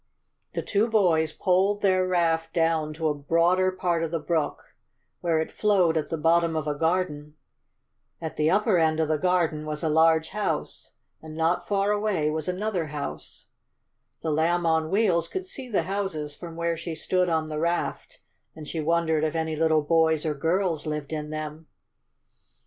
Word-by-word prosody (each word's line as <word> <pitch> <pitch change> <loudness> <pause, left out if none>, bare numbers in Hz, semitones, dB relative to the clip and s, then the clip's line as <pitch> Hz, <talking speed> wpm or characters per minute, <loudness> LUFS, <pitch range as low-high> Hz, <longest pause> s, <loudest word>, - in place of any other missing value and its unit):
The - - -3
two 215 +3 +1
boys 170 -8 +3
poled 195 +4 +1
their 185 -1 +3
raft 165 -2 +1
down 165 -2 +1
to 160 0 -1
a - - +1
broader 170 +6 +2
part 180 -3 -1
of 165 - -1
the 165 - -1
brook, 160 0 -2 0.5
where 165 -2 +1
it 160 - -3
flowed 190 -6 +2
at 155 - -1
the 165 - -2
bottom 165 +1 +2
of 155 -1 -2
a 150 - 0
garden. 150 -2 -1 0.8
At 160 -2 -5
the 155 +1 +2
upper 205 0 +3
end 160 -1 +2
of 160 - +2
the 155 -1 0
garden 170 -3 +1
was 155 0 -3
a 160 - +1
large 160 +1 +3
house, 210 -1 -3 0.3
and 155 -1 -10
not 170 +2 0
far 200 0 +1
away 205 -8 0
was 155 -1 -3
another 185 -2 -2
house. 145 - -7 0.8
The 160 - -1
Lamb 170 +3 +1
on 160 -1 +1
Wheels 185 -4 +2
could 375 0 -5
see 270 -9 -7
the 210 - +1
houses 190 -7 -3
from 170 -2 -9
where 170 0 -1
she 165 0 -5
stood 180 +3 0
on 160 -1 +1
the 155 -1 -4
raft, 170 +2 -2 0.3
and 155 -2 -9
she 165 - -4
wondered 160 0 +1
if 155 0 -1
any 160 -1 -1
little 160 -1 +2
boys 160 0 +2
or 155 - 0
girls 165 +1 -1
lived 150 0 -4
in 150 -1 -4
them. 155 +1 -6
165 Hz, 180 wpm, -26 LUFS, 155-180 Hz, 0.8 s, boys